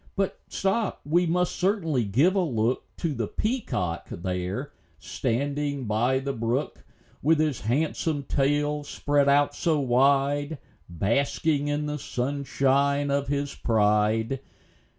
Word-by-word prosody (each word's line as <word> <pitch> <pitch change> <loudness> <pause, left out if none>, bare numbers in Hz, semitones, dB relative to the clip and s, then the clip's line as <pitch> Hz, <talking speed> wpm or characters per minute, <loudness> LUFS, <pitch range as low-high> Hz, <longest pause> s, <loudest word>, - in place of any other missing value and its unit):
But 195 -1 -1
stop! 195 +2 -1
we 170 +4 +2
must 180 +2 +1
certainly 165 - +1
give 135 - +3
a 200 - +1
look 120 -6 0
To 165 -4 -1
the 115 -5 -2
peacock 205 - -2
there, 90 - -4 0.2
standing 140 - -2
by 115 +5 +1
the 135 +1 -2
brook, 115 - -2 0.4
With 160 +3 +4
his 150 -6 0
handsome 145 +4 0
tail 145 +2 0
spread 145 0 +1
out 145 +1 +4
so 160 -3 +1
wide, 140 +3 +2 0.3
Basking 140 - 0
in 145 +1 -1
the 150 0 -3
sunshine 140 +2 0
of 140 0 0
his 140 0 -1
pride. 110 +2 +1
140 Hz, 125 wpm, -26 LUFS, 120-150 Hz, 0.4 s, With